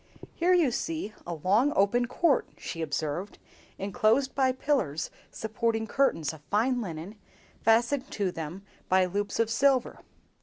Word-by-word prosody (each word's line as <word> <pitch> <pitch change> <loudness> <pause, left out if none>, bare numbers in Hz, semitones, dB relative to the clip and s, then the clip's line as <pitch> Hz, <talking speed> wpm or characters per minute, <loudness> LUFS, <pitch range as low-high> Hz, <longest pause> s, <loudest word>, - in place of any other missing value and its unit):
"Here 360 +2 +3
you 325 -8 +3
see 315 -4 -3
a 170 - -3
long 205 - +2
open 240 +5 +3
court," 280 +3 +2
she 165 - -6
observed, 160 +5 -3 0.4
"enclosed 215 +7 +1
by 265 -2 +3
pillars 255 - -1 0.2
supporting 225 0 -1
curtains 205 - +1
of 155 - -12
fine 245 +4 +2
linen, 185 +2 -7 0.4
fastened 235 +4 +2
to 200 -3 -1
them 165 +4 -6 0.3
by 185 0 +4
loops 205 +4 -2
of 230 -1 +2
silver. 265 +1 +2
220 Hz, 140 wpm, -28 LUFS, 185-260 Hz, 0.4 s, by